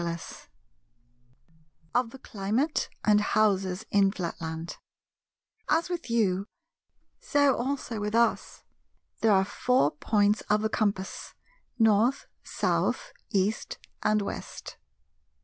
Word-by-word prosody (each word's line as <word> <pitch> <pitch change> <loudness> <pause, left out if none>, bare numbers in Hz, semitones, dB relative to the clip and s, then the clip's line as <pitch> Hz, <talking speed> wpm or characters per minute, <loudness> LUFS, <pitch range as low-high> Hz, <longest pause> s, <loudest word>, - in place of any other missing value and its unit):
§ 170 -1 -6
2 - - -35 1.4
Of 245 -1 +2
the 265 - -11
Climate 230 +6 -1 0.2
and 210 -1 +5
Houses 195 -2 +1
in 200 -1 +4
Flatland 165 -3 -5 0.9
As 325 +3 +2
with 345 -7 -4
you, 200 -4 +1 0.7
so 285 - +3
also 245 -3 -3
with 210 +1 -2
us, 235 0 +1 0.6
there 225 - +3
are 190 -1 +4
four 250 - +2
points 205 +6 +1
of 210 +1 +3
the 220 - +1
compass 200 -3 -2 0.4
North, 225 +3 +3 0.2
South, - - -1 0.2
East, 200 +2 0 0.2
and 210 -1 +2
West. - - -7
210 Hz, 110 wpm, -28 LUFS, 195-235 Hz, 1.4 s, and